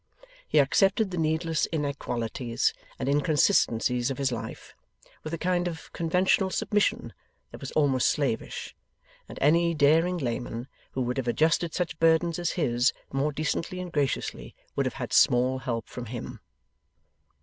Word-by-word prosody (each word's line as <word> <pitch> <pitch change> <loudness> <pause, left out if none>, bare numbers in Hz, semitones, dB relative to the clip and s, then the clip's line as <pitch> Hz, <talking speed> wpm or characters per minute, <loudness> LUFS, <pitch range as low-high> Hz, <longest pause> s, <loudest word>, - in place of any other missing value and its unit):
He - - 0
accepted 195 - +3
the 180 - -3
needless 160 0 0
inequalities 125 -6 -1 0.2
and - - -3
inconsistencies 140 - +2
of 135 - -3
his 135 -2 0
life, 115 -2 -6 0.5
with 155 - -5
a 165 - -2
kind 175 +1 0
of 165 -2 -7
conventional 180 +3 +2
submission 210 +2 0 0.4
that - - -11
was - - -6
almost 135 -4 +3
slavish; 140 -7 -2 0.5
and - - -9
any 170 +3 +4
daring 160 +5 +3
layman 120 -3 -3 0.3
who 130 - -1
would 125 +1 -2
have 130 -2 -2
adjusted 160 +5 +1
such 175 -2 -2
burdens 165 +1 +3
as 175 - -1
his, 125 -5 +2 0.2
more 140 +3 +1
decently 155 +4 -2
and 180 -1 -6
graciously, 135 - -2 0.2
would - - +1
have - - -5
had - - -5
small 125 +2 +4
help 115 -3 -3
from 125 -1 -7
him. 120 +1 -7
150 Hz, 150 wpm, -27 LUFS, 125-170 Hz, 0.5 s, any